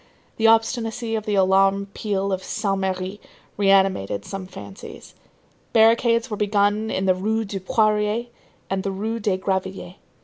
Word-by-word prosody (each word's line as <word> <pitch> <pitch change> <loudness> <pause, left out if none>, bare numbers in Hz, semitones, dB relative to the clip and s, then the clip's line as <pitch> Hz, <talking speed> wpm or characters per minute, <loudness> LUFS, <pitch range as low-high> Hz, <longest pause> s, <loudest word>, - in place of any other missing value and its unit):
The 225 - +3
obstinacy 225 0 +1
of 215 -1 -3
the 210 - +1
alarm 195 +1 +3
peal 200 -2 -2
of 190 0 -3
Saint 200 -2 -2
Merry 190 +1 -3 0.3
reanimated 190 - +2
some 195 -1 -6
fancies. 100 - -11 0.6
Barricades 230 +1 +4
were 210 - -2
begun 205 +1 +1
in 190 - -1
the 185 - +4
Rue 220 +4 -1
du 195 -1 -5
Poirier 215 +3 +1 0.4
and 195 0 -1
the 195 - -3
Rue 215 +4 -3
des 205 -3 0
Gravilliers. 190 -1 -3
200 Hz, 145 wpm, -23 LUFS, 190-220 Hz, 0.6 s, Barricades